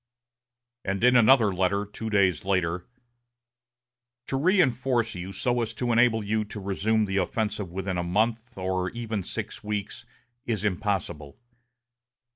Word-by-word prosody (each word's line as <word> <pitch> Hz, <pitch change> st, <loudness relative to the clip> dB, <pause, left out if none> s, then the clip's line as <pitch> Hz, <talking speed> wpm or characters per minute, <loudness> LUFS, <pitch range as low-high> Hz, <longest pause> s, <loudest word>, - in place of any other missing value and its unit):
And 100 Hz, +2 st, -2 dB
in 125 Hz, 0 st, +6 dB
another 115 Hz, -3 st, +6 dB
letter, 95 Hz, +3 st, +1 dB
two 110 Hz, +2 st, -6 dB
days 100 Hz, -5 st, +2 dB
later: 90 Hz, -2 st, 0 dB, 1.4 s
"To -, -, -1 dB
reinforce 130 Hz, -, +2 dB
you 90 Hz, 0 st, -6 dB
so 120 Hz, +5 st, 0 dB
as 115 Hz, -1 st, -3 dB
to 120 Hz, +2 st, -1 dB
enable 115 Hz, -1 st, +3 dB
you 110 Hz, +1 st, 0 dB
to 105 Hz, 0 st, -8 dB
resume 105 Hz, +3 st, +1 dB
the 100 Hz, 0 st, -2 dB
offensive 105 Hz, -2 st, -1 dB
within 95 Hz, 0 st, -3 dB
a -, -, -1 dB
month, 110 Hz, +6 st, -1 dB
or 95 Hz, -1 st, -1 dB
even 115 Hz, -1 st, -4 dB
six -, -, -6 dB
weeks, 105 Hz, -1 st, -4 dB, 0.4 s
is 110 Hz, -3 st, -1 dB
impossible.... 90 Hz, -7 st, -2 dB
105 Hz, 135 wpm, -26 LUFS, 95-115 Hz, 1.4 s, in